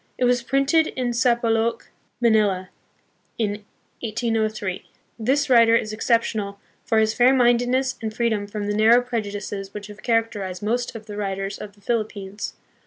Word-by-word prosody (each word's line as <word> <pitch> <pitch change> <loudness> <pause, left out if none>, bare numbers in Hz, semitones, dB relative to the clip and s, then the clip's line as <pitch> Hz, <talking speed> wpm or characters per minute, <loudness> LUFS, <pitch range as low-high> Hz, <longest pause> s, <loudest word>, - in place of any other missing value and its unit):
It - - -1
was 245 0 +3
printed 275 +5 +2
in 245 -2 -1
Sampaloc, 235 -2 +1 0.3
Manila, 210 -6 +2 0.7
in 210 -2 -2 0.4
1803. 215 -4 -2 0.3
This 270 +6 +1
writer 230 -3 +6
is 215 -2 0
exceptional 215 -3 0 0.2
for 225 - +1
his 220 0 +3
fairmindedness 250 +1 +3
and 220 -1 -3
freedom 220 -3 -1
from 205 0 -4
the 205 0 -1
narrow 225 +3 +6
prejudices 205 -4 -4
which 205 -1 -6
have 210 0 -12
char 230 -2 +3
acterized 195 -4 -7
most 240 +3 -1
of 220 -1 -8
the 205 -1 -8
writers 195 -1 -3
on 205 -1 -8
the 205 - -24
Philippines. 205 -3 -3
220 Hz, 150 wpm, -23 LUFS, 205-240 Hz, 0.7 s, writer